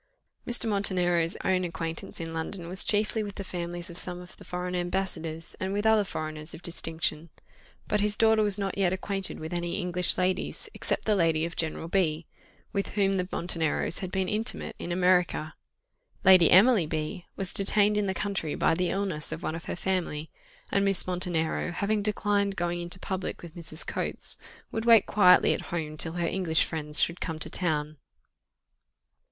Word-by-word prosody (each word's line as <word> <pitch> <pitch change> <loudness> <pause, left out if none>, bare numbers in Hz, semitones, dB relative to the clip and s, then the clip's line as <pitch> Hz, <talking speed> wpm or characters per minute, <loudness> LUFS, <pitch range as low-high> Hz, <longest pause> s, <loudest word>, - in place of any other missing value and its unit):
Mr. 240 -1 +2
Montenero's 180 -5 +1
own 185 -1 +2
acquaintance 165 -1 -5
in 165 -1 -5
London 170 +2 -5
was 185 +3 +2
chiefly 215 +1 +2
with 205 -2 -5
the 195 - -5
families 175 -1 -5
of 175 -1 -3
some 180 -1 -4
of 180 0 -12
the - - -13
foreign 180 0 -4
ambassadors, 175 -3 -3
and 190 +1 -2
with 205 +1 -1
other 220 -1 +5
foreigners 155 -4 -4
of - - -13
distinction; 165 -1 -1 0.6
but 210 - +1
his 210 0 +2
daughter 220 -1 +4
was 205 -2 +2
not 195 -1 -2
yet 185 -3 +3
acquainted 195 0 -1
with 160 +2 -6
any 175 +2 -2
English 180 -1 +1
ladies, 185 0 -1
except - - -1
the 215 - +3
lady 165 -3 +2
of 170 - -6
General 160 0 -3
B, 165 -3 +1 0.5
with 200 -1 -1
whom 195 -1 +2
the 185 -2 0
Monteneros 165 -1 -1
had 185 - -4
been 190 -1 0
intimate 220 +4 -3
in 175 - -5
America. 180 -3 +2 0.7
Lady 185 -4 +7
Emily 200 -2 +6
B 155 +2 -4
was 190 -2 0
detained 205 +1 +3
in 210 -1 +1
the 190 - -1
country 195 -7 -2
by - - +2
the 180 +1 0
illness 190 -6 -2
of 160 - -5
one - - -2
of 165 0 -7
her - - -3
family, 175 -4 -2 0.4
and 200 - +2
Miss 195 -2 +1
Montenero, 175 -3 -1
having 205 +3 0
declined 205 -1 0
going 175 0 -1
into 175 +1 -5
public 190 -1 -4
with 170 -2 -9
Mrs. 165 -2 -5
Coates, - - -3 0.4
would 225 - -2
wait 230 -3 +7
quietly 180 -3 +5
at - - -3
home 155 -3 -3
till 160 +1 -2
her 175 -1 -1
English 170 -3 +2
friends 150 -2 +2
should 170 +1 +1
come 160 -2 -3
to 155 - -5
town. 155 -3 -1
180 Hz, 180 wpm, -28 LUFS, 165-195 Hz, 0.7 s, Lady